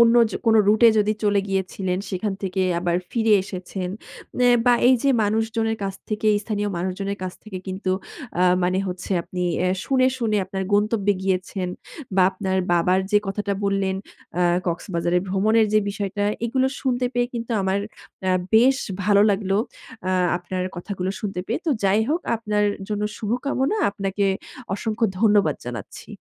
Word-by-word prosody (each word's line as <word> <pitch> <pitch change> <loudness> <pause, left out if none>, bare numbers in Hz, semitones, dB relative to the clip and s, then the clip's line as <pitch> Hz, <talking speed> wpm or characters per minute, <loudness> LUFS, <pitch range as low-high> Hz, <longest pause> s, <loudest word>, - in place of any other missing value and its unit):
অন্য 235 0 +6 0.2
জো - - -3
কোন 225 - +5
রুটে 220 +3 +6
এ - - +1
যদি 210 0 +3
চলে 205 -1 +3
গিয়েছিলেন 190 -1 -1
সেখান 195 +2 -2
থেকে 190 0 -1 0.2
আবার 175 -1 0
ফিরে 225 -2 +2
এসেছেন। 185 -1 -5 0.6
এ - - +6 0.2
বা 245 - +7
এই 260 - +7
যে, 280 - +2
মানুষজনের 225 +1 0
কাছ 195 -1 -3
থেকে 215 0 -2 0.2
স্থানীয় 205 -1 -2
মানুষজনের 190 +3 -3
কাছ 185 - -4
থেকে 205 -4 -6
কিন্তু 190 0 -3 0.5
আ - - +5 0.2
মানে 185 +1 +1
হচ্ছে 180 +1 -6
আপনি 180 +1 -5 0.2
অ্যা 185 - +2 0.2
শুনে, 260 -1 +3
শুনে 220 -3 +1
আপনার 190 +1 -4
গন্তব্যে 205 0 +2
গিয়েছেন 185 0 -1 0.5
বা 190 - +6
আপনার 190 -1 -2 0.2
বাবার 180 +2 +3
যে, 210 - +5
কথাটা 200 +1 -2
বললেন 195 -1 +1 0.5
আ - - +4 0.2
কক্সবাজারে 170 0 0
ভ্রমণের 215 +4 +3
যে, 215 - +6
বিষয়টা 200 0 -2 0.2
এগুলো 260 +3 +1
শুনতে 250 -2 0
পেয়ে 245 0 +2
কিন্তু 235 0 -4
আমার 190 +1 +1 0.5
আ - - +3 0.2
বেশ 255 +4 +6 0.3
ভালো 200 0 +5
লাগলো 195 -1 0 0.5
আ - - +1 0.3
আপনার 180 +1 -4
কথাগুলো 185 +1 -3
শুনতে 195 -4 -3
পেয়ে। 230 - -1
তো 315 - +3
যাই 195 +2 +4
হোক 325 +4 +1 0.2
আপনার 210 -2 0 0.2
জন্য 210 -1 -2 0.2
শুভকামনা, 260 - -1
আপনাকে 200 0 -2 0.5
অসংখ্য 220 +3 0
ধন্যবাদ 205 -9 +4
জানাচ্ছি। 120 -4 -8
200 Hz, 160 wpm, -23 LUFS, 185-220 Hz, 0.6 s, বা